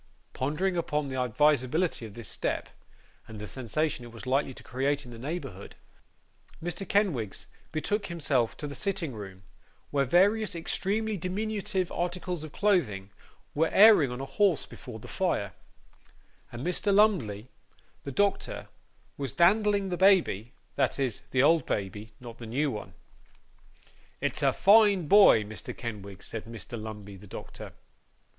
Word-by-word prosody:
Pondering 155 +8 -1
upon 150 -4 -1
the 130 -1 -2
advisability 145 +2 +1
of 105 - -14
this 115 -3 -8
step, - - -2 0.6
and 110 - -9
the 105 - -6
sensation 130 - -2
it 120 - -10
was 115 +1 -10
likely 135 +1 +1
to - - -13
create 140 +3 -1
in 120 - -11
the 115 - -10
neighbourhood, 130 - -6 0.8
Mr. 175 +3 -5
Kenwigs 155 - 0 0.3
betook 205 +6 -1
himself 145 -9 0
to - - -6
the 145 - -5
sitting 185 -5 -2
room, 95 -3 -9 0.5
where 140 -1 +2
various 195 - +3
extremely 205 +5 -1
diminutive 190 0 -2
articles 175 -1 -3
of 155 - -8
clothing 115 - +1 0.4
were 160 +2 +2
airing 200 - +7
on 125 +1 -5
a 135 - -4
horse 165 +4 +2
before 125 -3 -10
the 110 - -11
fire, 105 - -1 1.0
and 120 +4 -6
Mr. 180 +3 0
Lumbey, 160 - +3 0.5
the 140 - -6
doctor, 200 +9 0 0.5
was 140 -2 -3
dandling 200 +2 +3
the 175 - -1
baby 175 - +3 0.3
that - - +1
is, 130 -6 -1
the 130 0 +3
old 165 +2 +5
baby 105 +2 -3
not 120 -2 -10
the 115 - -8
new 140 +5 0
one. 105 - -7 1.2
'It's - - -1
a - - +4
fine 200 -4 +5
boy, 195 - +7
Mr. 105 +1 -8
Kenwigs,' 100 -5 -7
said 115 - -5
Mr. 115 0 -7
Lumbey, 105 -2 -8
the 100 +2 -14
doctor. - - -9
145 Hz, 150 wpm, -28 LUFS, 115-185 Hz, 1.2 s, airing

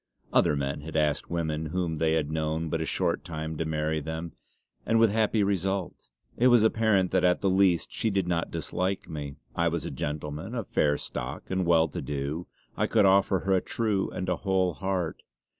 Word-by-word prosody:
Other 75 - +4
men 70 0 -2
had 80 +2 -8
asked 75 -2 +1
women 80 -2 -2
whom 85 -1 -2
they 80 -1 +2
had 80 -2 0
known 80 +1 -1
but 80 +1 -1
a 80 - -2
short - - 0
time 80 -1 -5
to 80 - 0
marry 80 0 -1
them; 80 +2 -5 0.5
and 115 0 +2
with 115 -2 +5
happy 110 0 +2
result. 95 -1 0 0.4
It 125 - +4
was 120 -3 +6
apparent 110 -4 +3
that 95 -1 +2
at 90 0 +3
the 95 - +2
least 95 -3 +3
she 110 - -1
did 95 -3 0
not 85 -1 0
dislike 90 +4 -2
me. 75 -4 -6 0.2
I 85 - +2
was 85 0 -1
a - - -4
gentleman, 75 +8 -4
of 115 -5 -3
fair 75 -1 +2
stock, - - -5
and 95 -2 0
well 80 -1 +5
to - - -5
do; 75 +4 -3 0.3
I - - +1
could 100 - +4
offer 95 -1 +4
her 95 0 +1
a 95 - +3
true 105 -4 -1
and 90 - -4
a 90 - 0
whole 95 -3 +1
heart. 95 -1 -2
85 Hz, 205 wpm, -28 LUFS, 80-95 Hz, 0.5 s, was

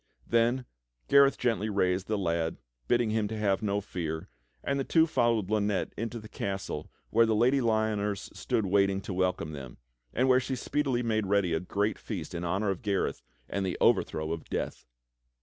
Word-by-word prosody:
Then 120 +2 +2 0.4
Gareth 140 0 +6
gently 115 -3 0
raised 95 -2 +1
the 110 - 0
lad, 85 -3 -1 0.3
bidding 120 -2 +2
him 110 -2 0
have 105 -3 0
no 100 -1 0
fear, 80 -5 -4 0.3
and 140 0 0
the - - +1
two 160 +4 +4
followed 115 - +1
Lynette 105 -2 0
into 115 +2 -4
the 110 - -10
castle 95 -7 -4 0.2
where 115 +1 +5
the 110 - +2
Lady 130 +5 +3
Lyoners 110 -3 0
stood 110 - 0
waiting 100 0 +3
to 95 - -5
welcome 90 -3 0
them, 65 -5 -8 0.3
and 130 +2 +1
where 130 0 +6
she 130 +1 -3
speedily 130 -1 0
made 110 -3 0
ready 100 -4 +2
a 80 - +1
great 100 +4 -1
feast 90 -6 -5
in 85 0 -4
honor 95 +4 0
of 95 - -4
Gareth 100 -2 -1 0.3
and 100 - -2
the 95 -1 -2
overthrow 80 0 +2
of 80 - -6
Death. - - -3
105 Hz, 180 wpm, -29 LUFS, 95-115 Hz, 0.4 s, Gareth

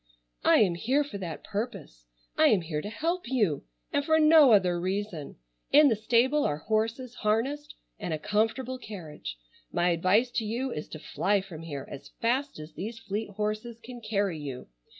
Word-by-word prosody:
"I - - +6
am 190 -5 +4
here 255 +12 +1
for 230 -9 -7
that 170 -4 -6
purpose. 200 - -5 0.3
I - - +4
am 200 - +4
here 155 -2 -3
to 205 - -5
help 330 +5 -2
you 210 - +1 0.3
and 285 - +2
for 315 +1 +3
no 305 -4 +7
other 180 -4 +4
reason. 185 -4 -3 0.4
In 295 0 +7
the 225 - +2
stable 245 +7 +2
are 145 - 0
horses 225 - -1
harnessed 265 +8 -1 0.2
and 175 - -4
a 155 - 0
comfortable 225 +7 -1
carriage. 155 - -8 0.3
My 175 - +2
advice 185 +8 +3
to 235 - -1
you 240 +5 -2
is 150 - -5
to - - -8
fly 200 +6 0
from 185 -5 -9
here 145 -4 -6
as 140 - -9
fast 260 +5 0
as 155 +1 -9
these 220 +4 -5
fleet 215 0 -4
horses 215 +3 -3
can 240 +1 -10
carry 200 -6 -1
you. 135 -4 -7
215 Hz, 180 wpm, -28 LUFS, 175-245 Hz, 0.4 s, no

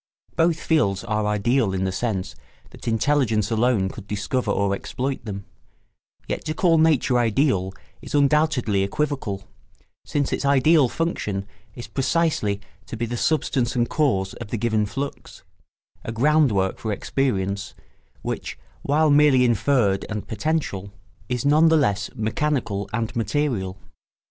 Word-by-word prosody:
Both 165 -1 +2
fields 100 - +1
are 105 0 -1
ideal 105 0 +1
in 95 - -1
the 95 - 0
sense 95 - -2 0.4
that - - -12
intelligence 115 -3 +1
alone 115 -3 +2
could 100 0 -10
discover 105 +3 -2
or 100 -1 +1
exploit 130 +7 -3
them; 100 -2 -6 0.8
yet - - -3
to 155 - -2
call 165 -2 +3
nature 150 -6 +3
ideal 115 -5 +1 0.3
is - - -5
undoubtedly 140 -8 +2
equivocal, 100 -2 -2 0.6
since 145 -2 -1
its - - -2
ideal 140 0 +4
function 105 - -2 0.3
is 120 - -7
precisely 130 -4 0 0.3
to 115 - -6
be 120 - -1
the 120 +1 -4
substance 130 -3 0
and 120 -1 +1
cause 100 -11 +1
of - - -8
the 115 - -3
given 110 -1 +1
flux, 140 +6 -6 0.6
a - - -4
ground 145 +4 +3
work 95 -2 0
for 110 - -3
experience 100 -3 -2 0.5
which, - - -4 0.2
while 150 +2 +2
merely 145 -3 +5
inferred 115 -3 +2
and 105 -1 -4
potential, 110 -7 -2 0.4
is 125 0 -2
none 155 +3 +5
the 160 0 +5
less 105 -8 +1
mechanical 110 -2 -1
and 115 0 -2
material. 110 -4 -1
120 Hz, 140 wpm, -23 LUFS, 100-145 Hz, 0.8 s, merely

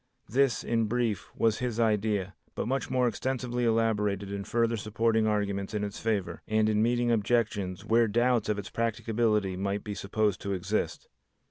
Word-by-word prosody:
This, 135 +1 +2
in 115 -1 +1
brief, 115 -2 -1
was 110 -2 +2
his 120 -2 -2
idea, 105 -3 +1 0.2
but - - -2
much 135 +2 -1
more 125 -1 +2
extensively 125 +1 -2
elaborated 105 -3 +1
in 100 0 -3
further 115 +2 +1
supporting 110 +1 +1
arguments 100 -1 -1
in 105 - -1
its 100 -1 -4
favor 100 -7 -1
and 110 0 +2
in 105 -1 +2
meeting 120 +1 +2
objections 105 -4 0
where 115 +1 +4
doubts 120 +2 +2
of 105 - +1
its 100 -1 -6
practicability 110 -3 0
might 100 +2 -2
be 105 - -4
supposed 100 0 -1
to 100 - -2
exist. 95 +3 -2
110 Hz, 165 wpm, -29 LUFS, 100-115 Hz, 0.2 s, where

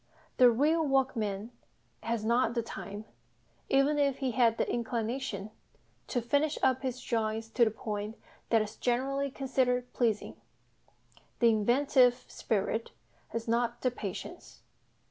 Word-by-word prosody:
The 250 -1 +8
real 300 +8 +2
workman 240 -7 0 0.5
has 230 -2 -2
not 235 +1 +2
the 235 - 0
time, 205 0 -7 0.6
even 275 +2 +3
if 280 -2 +2
he 265 -2 -1
had 230 -2 +3
the - - 0
inclination, 230 -3 -3 0.6
to 245 -3 -1
"finish 285 +5 +1
up" 260 -1 +3
his 255 -2 -3
drawings 225 -2 -2
to 235 +1 +3
the - - +2
point 210 0 -5 0.3
that 225 -2 +4
is 215 +1 -9
generally 270 +3 0
considered 255 -2 0
pleasing; 225 -4 0 1.0
the 235 - +5
inventive 245 +3 +4
spirit 220 +1 -2 0.4
has 230 0 -5
not 235 +1 0
the 255 - +1
patience. 235 - -7
240 Hz, 130 wpm, -30 LUFS, 225-265 Hz, 1.0 s, The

